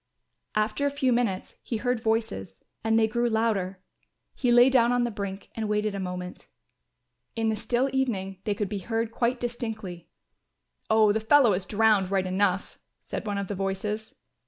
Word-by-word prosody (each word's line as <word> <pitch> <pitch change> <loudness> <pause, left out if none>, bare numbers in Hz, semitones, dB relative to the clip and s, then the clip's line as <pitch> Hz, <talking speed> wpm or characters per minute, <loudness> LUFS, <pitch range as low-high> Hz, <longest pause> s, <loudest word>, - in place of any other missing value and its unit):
After 215 +7 +1
a - - +2
few 275 -3 +1
minutes 225 -6 -1
he 230 - -3
heard 245 +2 0
voices 220 - -2 0.2
and 225 0 +3
they 220 -1 +4
grew 235 +2 0
louder; 200 -5 0 0.5
he 250 -3 +1
lay 245 +1 +7
down 245 -3 +4
on 245 0 +2
the 240 - -1
brink 200 -2 -6
and 220 -2 -3
waited 210 0 0
a 200 - -4
moment. 180 -1 -6 0.9
In 225 -1 +1
the 220 - +1
still 240 +4 0
evening 195 -8 -1
they 205 - -1
could 205 0 -1
be 200 0 -3
heard 225 +3 -2
quite 240 +2 0
distinctly. 220 -8 -5 0.8
"Oh, 220 -1 +5
the 220 - +1
fellow 235 0 +5
is 185 +1 -2
drowned 215 -3 +3
right 190 -1 +1
enough," 185 0 0 0.2
said - - -5
one 205 -1 -1
of 200 -1 -2
the 205 - -3
voices. 200 +3 -3
215 Hz, 180 wpm, -27 LUFS, 195-235 Hz, 0.9 s, lay